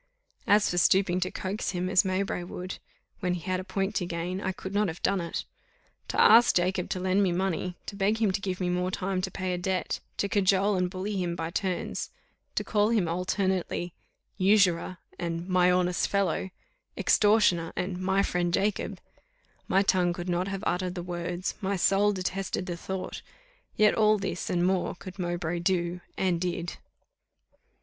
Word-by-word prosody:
As 205 +1 +5
for 175 - +1
stooping 185 0 +3
to 185 0 0
coax 190 +2 -3
him 180 0 -1
as 185 0 +4
Mowbray 190 -1 -1
would, 180 +1 -6 0.4
when 180 -1 0
he 175 - -6
had 185 +2 -1
a - - -4
point 195 +1 -2
to 180 - -1
gain, 175 +2 -3
I 190 - -1
could 190 +1 -7
not 205 0 +2
have 165 0 -6
done 195 -2 +2
it. 170 - -4 0.6
To - - -2
ask 230 +2 +7
Jacob 180 +1 +1
to 185 - -2
lend 185 +2 +2
me 190 -3 +2
money, 180 0 -1
to 200 - -6
beg 200 +2 +1
him 215 -4 +3
to 190 - -2
give 185 -2 -3
me 180 - 0
more 180 +1 0
time 185 0 -2
to 190 - -2
pay 185 0 -3
a 180 - -2
debt, 185 0 -1 0.2
to 200 - 0
cajole 200 0 +3
and 180 -1 +1
bully 195 +2 -3
him 170 -1 -2
by 165 -1 -4
turns, 185 -1 -2 0.5
to - - 0
call 210 -1 +2
him 215 -7 +2
alternately 180 0 -1 0.5
usurer 185 -2 +3 0.2
and 170 0 -3
my 180 -1 +4
honest 180 0 +2
fellow, 190 -2 0 0.5
extortioner 205 -6 +3
and 180 0 -3
my 190 +1 +2
friend 175 -2 0
Jacob 200 +1 -1 0.7
my 195 +1 +3
tongue 180 -3 +2
could 175 0 -6
not 180 +2 0
have 195 0 -4
uttered 180 0 -1
the 175 - -4
words, 175 +1 -3
my 200 0 0
soul 195 +3 +3
detested 190 -1 -2
the 175 -2 -3
thought; 190 +2 -5 0.5
yet 210 0 +5
all 215 -1 +4
this, 185 -3 -3
and 175 0 +1
more, 185 -1 0
could 185 +1 -10
Mowbray 175 -1 -2
do, 175 0 0 0.2
and 180 -3 +1
did. 175 -1 -3
185 Hz, 185 wpm, -28 LUFS, 175-195 Hz, 0.7 s, ask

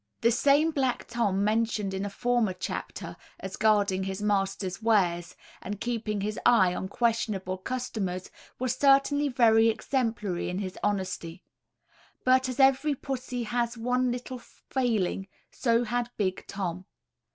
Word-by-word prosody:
The 235 - +4
same 285 +6 +4
black 265 -5 -1
Tom 205 -5 0
mentioned 215 -2 0
in 190 +1 -2
a - - -3
former 240 -1 +1
chapter, 180 - -5 0.2
as 190 0 -6
guarding 205 -3 +2
his 190 0 -4
master's 195 -1 -1
wares, 180 -6 +1 0.3
and 205 +1 -5
keeping 220 -3 -2
his 210 +1 -3
eye 190 -7 +5
on 190 - -4
questionable 210 -5 -1
customers, 195 -6 -4 0.3
was 255 0 0
certainly 280 +2 +4
very 230 -4 +5
exemplary 225 -6 -1
in 180 - -3
his 190 -1 -4
honesty; 185 -3 -2 0.8
but 255 0 +4
as 255 - -5
every 270 +2 +4
pussy 255 -2 -4
has 235 +1 -1
one 250 +2 +1
little 250 +1 -5
failing 225 -6 -2 0.2
so 235 -1 +1
had 240 +1 -1
big 185 -3 -2
Tom. 185 -2 -4
225 Hz, 140 wpm, -28 LUFS, 195-245 Hz, 0.8 s, eye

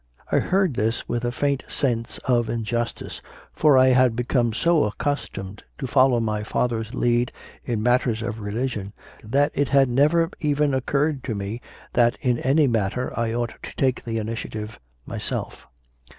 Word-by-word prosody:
I - - +4
heard 190 -5 +1
this 115 0 -1
with 120 0 -2
a 120 - 0
faint 140 +2 0
sense 115 -4 -1
of 120 -3 +2
injustice; 115 +1 -3 0.3
for 150 -4 +4
I 130 0 +6
had 125 -2 +4
become 120 0 +1
so 165 +7 +2
accustomed 105 -4 -4 0.2
to 140 - -4
follow 130 -1 +4
my 110 -2 -1
father 115 +2 -1
s 110 +3 -6
lead 120 0 +1 0.3
in 115 -3 -1
matters 120 -2 +2
of 115 -1 -4
religion 105 -1 -3 0.3
that 140 +7 +2
it 145 0 +1
had 135 -2 +4
never 155 +6 +3
even 145 -1 +1
occurred 140 +2 0
to 115 - -2
me 100 +4 -4 0.3
that 120 -1 +3
in 125 -2 +1
any 145 +4 +3
matter 115 0 -1
I 115 -1 -1
ought 120 -1 -2
to - - -9
take 130 -2 0
the 115 -1 -3
initia 110 +1 -4
tive 105 0 -6 0.3
myself. - - -4
120 Hz, 165 wpm, -24 LUFS, 115-135 Hz, 0.3 s, I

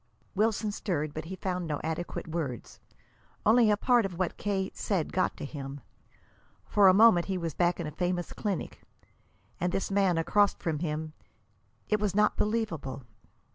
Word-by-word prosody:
Wilson 215 +1 +1
stirred, 155 -8 -2
but 155 0 -5
he 190 +3 -6
found 180 -2 -3
no 150 -2 -2
adequate 160 +2 -4
words. 155 -7 -5 0.7
Only 225 +1 +6
a 210 - +3
part 245 +2 +3
of 185 -3 -4
what 185 -1 -1
K. 195 -2 -2
said 185 -7 -2
got 185 - 0
to - - -5
him. 140 -1 -7 0.8
For 205 -2 +5
a - - +9
moment 205 -5 +6
he 190 -1 -1
was 165 -3 -3
back 175 +2 +1
in 170 - -3
a 150 - -4
famous 175 +2 -2
clinic, 200 -5 -4 0.8
and 180 0 0
this 195 +2 -2
man 195 -3 +3
across 205 +5 +3
from 160 -3 -3
him 155 -1 -3 0.7
it 210 - +1
was 205 -2 -1
not 210 0 +3
believable! 200 - -2
180 Hz, 170 wpm, -29 LUFS, 160-205 Hz, 0.8 s, a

